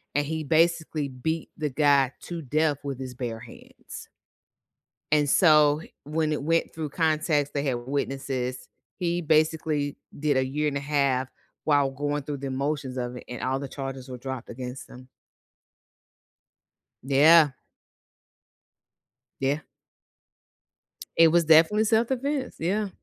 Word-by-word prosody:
and 145 - +2
he 160 +1 -3
basically 160 -2 +1
beat 160 +6 -3
the 150 -2 -1
guy 140 -1 +3
to 170 -2 -6
death 150 +1 +1
with 140 -2 -5
his 130 -1 -6
bare 120 -3 -4
hands. 120 -1 -12 1.0
And 145 -1 +3
so, 150 -2 +5
h - - -18
when 155 +1 -1
it 145 - -2
went 165 +2 +1
through 155 -2 -4
context, 155 -2 0
they 140 - -1
had 130 -4 0
witnesses, 130 -2 -3 0.3
he 175 -1 0
basically 155 -2 +1 0.2
did 145 -2 +1
a 130 - +2
year 150 +3 -1
and 140 - -3
a - - 0
half 140 -3 0 0.4
while 145 -3 +3
going 145 +2 -2
through 145 0 -5
the 135 0 -5
motions 135 -1 -2
of 125 0 -4
it - - -9
and 125 -1 -7
all 130 +1 0
the 140 - -5
charges 135 -1 -6
were 125 - -6
dropped 130 -1 -6
against 125 +2 -7
him. 130 +1 -13 1.9
Yeah. 145 +2 +6 1.9
Yeah. 140 +3 0 1.5
It 165 0 +7
was 170 +1 +3
definitely 165 +7 +5
self-defense. 260 +5 0
Yeah. 200 +5 -1
145 Hz, 140 wpm, -26 LUFS, 135-160 Hz, 1.9 s, It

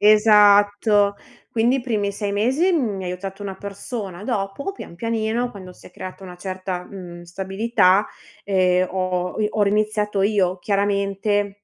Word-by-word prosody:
Esatto 205 -1 +5 0.3
quindi 235 +3 +2
i - - -2
primi 210 -5 -1
6 200 0 -3
mesi 260 - +2
mi 215 - 0
ha - - -5
aiutato 195 +2 -6
una 195 -1 -5
persona, 200 -1 -6
dopo 215 - -2
pian 390 - -10
pianino, 230 +3 -1
quando 185 -4 -10
si - - -17
è - - -13
creata 185 +1 -9
una 180 -1 -9
certa, 185 -1 -5
mhmm, 175 -3 -9
stabilità, 190 +2 +2 0.4
ehm, 185 -2 +2
ho 185 +1 -2
i 210 - +2
ho 215 - +1
riniziato 210 -1 +1
io, 195 -3 +1
chiaramente 200 0 0
200 Hz, 150 wpm, -22 LUFS, 190-215 Hz, 0.4 s, Esatto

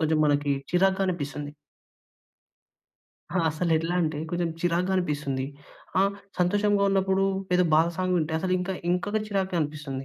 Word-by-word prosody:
కొంచెం 160 0 +2
మనకి 145 -1 +2 0.2
చిరాగ్గా 190 +2 +3
అనిపిస్తంది. 145 -4 -3 1.9
ఆ! - - +3
అసలెట్లా 165 +1 0
అంటే, 155 -2 -1
కొంచెం 175 -1 0
చిరాగ్గా 175 +2 +1
అనిపిస్తుంది. 145 -6 -1 0.6
ఆ! - - +6 0.4
సంతోషంగా 205 +3 +2
ఉన్నప్పుడు 195 0 +2 0.3
ఏదో 180 0 +4
బాధ 160 +2 +5
సాంగ్ 185 0 0
వింటే, 160 -1 -1
అసలు 185 +2 -1
ఇంక, 180 +1 -3 0.2
ఇంకొక 205 +4 0
చిరాగ్గా 190 -3 -1
అనిపిస్తుంది. 145 -3 -4
175 Hz, 130 wpm, -26 LUFS, 150-190 Hz, 1.9 s, ఆ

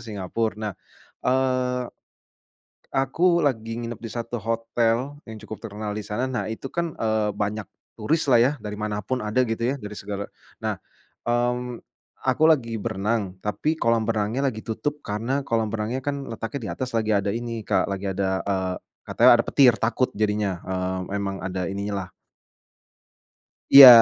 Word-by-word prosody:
Singapura, 105 +2 -2
nah, 110 -1 -3 0.5
eee 125 -1 +1 1.0
aku 170 +7 +3
lagi 115 -7 0
nginep 120 -2 -5
di 115 - -5
satu 120 0 -4
hotel 115 +3 0
yang 110 -1 -9
cukup 110 - -8
terkenal 105 -1 -4
di 105 - -3
sana, 110 +5 -2
nah 125 -4 -2
itu 110 +4 -5
kan, 170 +4 -2
eee, 110 -1 +1
banyak 105 +1 -2 0.3
turis 145 +9 0
lah 125 -3 +6
ya, 135 - +4
dari 105 -2 -6
mana 105 0 -2
pun 125 +5 -2
ada 110 +4 +1
gitu 115 0 -2
ya, 125 +3 +2
dari 105 -2 -7
segala, 100 0 -5 0.3
nah, - - -1 0.5
mmm, 120 0 0 0.5
aku 130 +4 +3
lagi 120 -7 +2
berenang, 100 -1 -1
tapi 105 +12 -1
kolam 115 -3 +3
renangnya 110 +4 0
lagi 110 -2 -9
tutup 145 +6 -2
karena 120 +7 -1
kolam 110 -3 +1
renangnya 115 +4 -2
kan 140 0 -3
letaknya 115 +4 -4
di - - -3
atas 130 0 -3
lagi 110 -2 +1
ada 100 0 +1
ini 115 0 -3
Kak, - - +1
lagi 100 0 -3
ada, 95 0 0
eee, 95 -2 -1 0.3
katanya - - +6
ada - - +2
petir 130 -4 +6
takut 120 +3 +1
jadinya, 105 -2 +1
eee, 95 +1 -2
emang 100 -1 -2
ada 95 0 -2
ininya 100 +1 -3
lah. - - -25 1.6
Iya, 140 -1 +14
115 Hz, 160 wpm, -25 LUFS, 105-125 Hz, 1.6 s, Iya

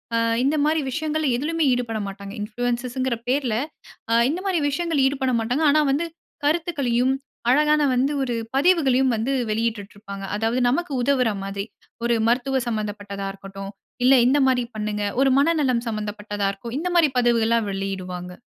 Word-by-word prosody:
ஆ - - +3 0.3
இந்தமாரி 305 +3 +2
விஷயங்கள்ல 310 +2 -1
எதிலுமே 325 +4 -1
ஈடுபட 230 -3 -2
மாட்டாங்க. 195 +1 -8
இன்ஃப்ளூயன்சஸ்ங்கிற 245 +3 -2
பேர்ல 255 -4 +1 0.6
அ - - +4 0.2
இந்தமாரி 365 +2 -1
விஷயங்கள் 325 0 0
ஈடுபட 265 -1 0
மாட்டாங்க. 245 +7 0
ஆனா, 305 - +4
வந்து 295 +5 0 0.4
கருத்துக்களையும் 280 -6 +1 0.4
அழகான 300 +2 +4
வந்து 260 +3 +2
ஒரு 245 -2 -2 0.2
பதிவுகளையும் 270 -5 +3
வந்து 230 +5 -1 0.2
வெளியிட்டு 215 -2 -2
இருப்பாங்க. 200 -1 -8
அதாவது 225 +4 0
நமக்கு 325 +5 -1
உதவுறமாரி. 205 -7 0 0.4
ஒரு 235 0 +2
மருத்துவ 260 +2 +1
சம்மந்தப்பட்டதா 205 -3 -4
இருக்கட்டும். 195 0 -9 0.3
இல்ல 265 +1 +7
இந்தமாரி 260 -2 +3
பண்ணுங்க. 210 -1 -2 0.2
ஒரு 270 - +4
மனநலம் 280 -6 +2
சம்மந்தப்பட்டதா 210 -2 -3
இருக்கும். 230 +5 -7
இந்தமாரி 345 -2 +3
பதவுகள்லாம் 230 -2 +2
வெளியிடுவாங்க. 185 -2 -5
245 Hz, 130 wpm, -23 LUFS, 210-285 Hz, 0.6 s, இல்ல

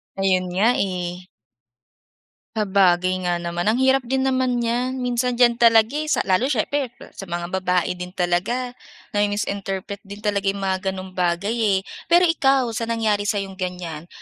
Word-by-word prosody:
Ayun 185 -1 +1
nga, 200 +4 +3
eh. 180 -1 -3 1.3
Sabagay 185 -3 +2
nga 175 - +1
naman. 175 +1 -3
Ang 215 - +3
hirap 265 +1 +5
din 265 +1 0
naman 255 -2 +1
niyan. 245 +2 -1
Minsan 245 0 0
diyan 240 -1 +4
talaga, 230 -1 +5
eh, 305 +2 -3
sa 305 - +1
lalo 190 +7 +2
siyempre 275 +2 0 0.2
sa 195 - -9
mga 175 0 -4
babae 180 -1 0
din 180 +1 -7
talaga 195 +8 0 0.4
nami-misinterpret 200 -1 -2
din 205 +2 -10
talaga 200 -1 0
'yong 195 0 -1
mga 190 -1 0
gano'ng 190 0 -4
bagay, 180 +3 0
eh. 215 -5 +2 0.3
Pero 345 +2 +5
ikaw, 270 -7 +3
sa 230 +1 -3
nangyari 215 -3 0
sa'yong 195 -2 -2
ganyan, 175 -3 -5
200 Hz, 155 wpm, -22 LUFS, 185-240 Hz, 1.3 s, hirap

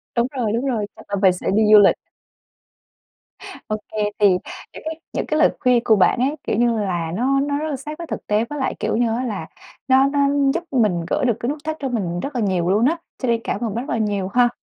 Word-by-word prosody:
Đúng 235 0 +2
rồi, 225 -4 0
đúng 235 +4 -1
rồi, 230 -6 -1
chắc - - -14
là 200 - -1
mình 185 -2 +5
sẽ 180 - -6
đi 220 - +4
du 210 - +10
lịch. 200 - +5 1.7
Ô 215 - -1 0.2
kê, 215 - -7 0.2
thì 205 - +6 0.5
những - - -10
cái 320 0 -5
những - - -2
cái 305 - 0
lời - - +6
khuyên 250 -3 +3
của 220 - +4
bạn 195 +5 +3
ấy, 275 +4 +1
kiểu - - -1
như 235 -1 +2
là, 175 -5 -2
nó 265 +6 +1
nó 285 +1 0
rất 310 +1 -3
là 290 - -2
sát 295 +3 -7
với 335 - -7
thực - - -6
tế, 210 +2 +1
với 295 -1 -5
lại, 265 - -1
kiểu - - -1
như 240 - +2
á, 250 - -2
là 200 -9 -4 0.4
nó 265 +1 +5
nó 285 +1 -1 0.3
giúp 340 +1 -2
mình 210 -10 +1
gỡ - - 0
được 235 -3 +1
cái 245 +1 -2
nút 295 - -2
thắt 315 0 -3
cho 270 - -3
mình 185 -8 -2
rất 275 +8 -5
là 240 - 0
nhiều 185 -4 0
luôn 210 +5 +3
á. 330 +4 +2 0.2
Cho 255 - -3
nên 230 -1 +1
cảm - - -2
ơn 220 -3 -3
bạn 240 +3 -3
rất - - -2
là 230 - -1
nhiều 205 -3 -1
ha. 245 -1 +4
235 Hz, 265 wpm, -21 LUFS, 205-275 Hz, 1.7 s, du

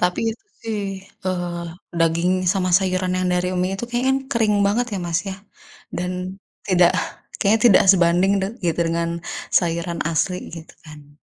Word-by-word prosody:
Tapi 180 0 +1
itu 315 - -18 0.2
sih, 220 -2 -2 0.5
eee, 175 -2 -2 0.3
daging 165 +2 +2 0.2
sama 185 -2 0
sayuran 185 -1 -1
yang 185 - 0
dari 180 0 0
mi 185 - +1
itu 195 - -4
kayaknya 245 +2 0
kan 265 - +2
kering 220 -3 +2
banget 235 +5 +1
ya - - -2
Mas 170 -1 0
ya, 190 - -5 0.6
dan 180 +1 -2 0.6
tidak 175 -2 +5 0.5
kayaknya 215 +3 +3
tidak 195 - +6
sebanding 180 +1 +3
tuh 195 +3 -2
gitu 170 0 0
dengan 165 0 0 0.5
sayuran 170 0 -2
asli, 180 +3 0 0.2
gitu 165 -1 -11
kan. 145 -1 -14
180 Hz, 160 wpm, -22 LUFS, 170-195 Hz, 0.6 s, tidak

